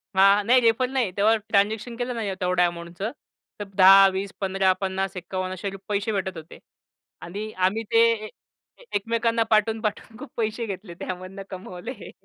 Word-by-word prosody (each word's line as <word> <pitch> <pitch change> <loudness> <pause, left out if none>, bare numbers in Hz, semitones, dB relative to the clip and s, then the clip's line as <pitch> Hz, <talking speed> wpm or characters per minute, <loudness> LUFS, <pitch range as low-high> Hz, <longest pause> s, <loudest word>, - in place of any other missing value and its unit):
हां, 195 +2 +5
नाही, 250 +2 +6
रेफर 230 +2 +3
नाही. 255 -7 0
तेव्हा 220 +3 +4
ट्रान्झॅक्शन 215 +3 +1
केलं 245 +1 -2
ना 230 - -3
या 200 -2 -2
तेवढ्या 180 0 +3
अमाउंटचं, 170 +5 -5 0.5
तर - - -3
10, 195 +1 +8
20, 195 +1 -3
15, 190 -1 +2
50, 190 0 -2
51 185 +1 -4
असे 195 +2 -4
रु 195 - -8
पैसे 205 +1 -1
भेटत 190 -3 -3
होते. 160 +1 -11 0.6
आणि 205 +5 -6 0.2
आम्ही 220 +4 -2
ते 230 0 +6 0.2
ए - - -8 0.7
एकमेकांना 230 +2 +1
पाठवून-पाठवून 220 0 0
खूप 285 - -9
पैसे 225 +1 -1
घेतले, 190 -2 -7
त्यामधन 185 +2 -6
कमवले. 190 +4 -8
200 Hz, 160 wpm, -24 LUFS, 190-225 Hz, 0.7 s, 10